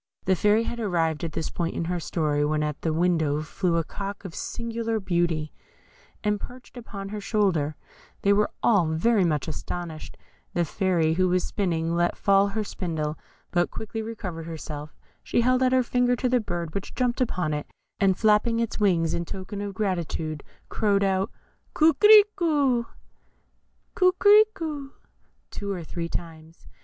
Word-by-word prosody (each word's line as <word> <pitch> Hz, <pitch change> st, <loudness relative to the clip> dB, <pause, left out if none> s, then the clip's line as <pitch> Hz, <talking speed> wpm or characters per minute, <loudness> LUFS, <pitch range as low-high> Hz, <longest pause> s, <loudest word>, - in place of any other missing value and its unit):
The 190 Hz, -, +3 dB
Fairy 210 Hz, +5 st, +3 dB
had 235 Hz, +1 st, -4 dB
arrived 165 Hz, -7 st, 0 dB
at 165 Hz, -3 st, -3 dB
this 160 Hz, -, -3 dB
point 170 Hz, -1 st, -2 dB
in 170 Hz, -, -2 dB
her 175 Hz, +1 st, -1 dB
story, 150 Hz, -3 st, 0 dB
when 150 Hz, +1 st, +1 dB
in 150 Hz, -, 0 dB
at 150 Hz, -, -8 dB
the 160 Hz, -, 0 dB
window 160 Hz, -3 st, +1 dB
flew 170 Hz, +2 st, -1 dB
a 165 Hz, -, +1 dB
cock 200 Hz, +4 st, -6 dB
of 180 Hz, -, -7 dB
singular 230 Hz, +1 st, -3 dB
beauty, 170 Hz, -5 st, -1 dB, 0.7 s
and 210 Hz, -1 st, +1 dB
perched 250 Hz, +4 st, -11 dB
upon 200 Hz, -5 st, -7 dB
her 210 Hz, 0 st, -5 dB
shoulder; 185 Hz, -9 st, +1 dB, 0.5 s
they 200 Hz, -, +5 dB
were 210 Hz, +1 st, +2 dB
all 200 Hz, -8 st, +4 dB
very 190 Hz, +7 st, +2 dB
much 150 Hz, -5 st, 0 dB
astonished; 160 Hz, 0 st, -6 dB, 0.4 s
the 175 Hz, -1 st, +2 dB
Fairy, 170 Hz, -2 st, +1 dB
who 185 Hz, +2 st, +2 dB
was 180 Hz, 0 st, +2 dB
spinning, 165 Hz, -5 st, -1 dB
let 175 Hz, 0 st, +1 dB
fall 200 Hz, 0 st, +4 dB
her 215 Hz, +2 st, -2 dB
spindle, 160 Hz, -6 st, -3 dB, 0.4 s
but 175 Hz, -1 st, +2 dB
quickly 220 Hz, 0 st, -5 dB
recovering 190 Hz, -7 st, -6 dB
herself, 155 Hz, -2 st, -7 dB, 0.3 s
she -, -, +1 dB
held 255 Hz, +2 st, +3 dB
out 255 Hz, -1 st, +3 dB
her 260 Hz, 0 st, +4 dB
finger 245 Hz, 0 st, +2 dB
to 250 Hz, -, -1 dB
the 250 Hz, 0 st, +3 dB
bird, 175 Hz, -6 st, -4 dB
which 200 Hz, -, -5 dB
jumped 250 Hz, -1 st, 0 dB
upon 180 Hz, -10 st, 0 dB
it, 150 Hz, 0 st, -3 dB, 0.3 s
and 190 Hz, -2 st, +3 dB
flapping 220 Hz, +2 st, +3 dB
its 230 Hz, -1 st, -2 dB
wings 175 Hz, -6 st, +2 dB
in 170 Hz, -, -1 dB
token 190 Hz, +3 st, -6 dB
of 200 Hz, -1 st, -5 dB
gratitude, 170 Hz, -6 st, -2 dB, 0.2 s
crowed 200 Hz, -2 st, +1 dB
out 195 Hz, +1 st, +1 dB, 0.5 s
"Coquerico" 320 Hz, -, +5 dB, 2.6 s
two 200 Hz, -1 st, -4 dB
or 180 Hz, -3 st, -4 dB
three 170 Hz, +1 st, -5 dB
times. 165 Hz, -1 st, -8 dB
185 Hz, 160 wpm, -26 LUFS, 165-220 Hz, 2.6 s, they